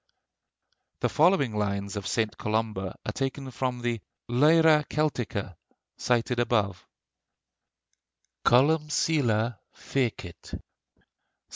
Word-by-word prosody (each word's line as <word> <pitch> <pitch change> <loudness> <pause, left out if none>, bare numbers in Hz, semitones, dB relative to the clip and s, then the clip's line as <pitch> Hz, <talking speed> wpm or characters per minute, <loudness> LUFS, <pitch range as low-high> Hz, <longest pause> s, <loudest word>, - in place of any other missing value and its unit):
The - - +1
following 150 - +3
lines 100 -1 -2
of 100 - -4
St. 110 -2 -1
Columba 105 -3 -2
are - - -2
taken 135 0 -4
from 125 0 -3
the 120 -3 -1 0.3
'Lyra 150 +4 +5
Celtica,' 120 - -2 0.4
cited 120 0 0
above: 105 -6 0 1.6
COLUMCILLE 135 - +2 0.2
FECIT 110 -10 -3
(ST. - - -8
120 Hz, 90 wpm, -27 LUFS, 105-140 Hz, 1.6 s, Lyra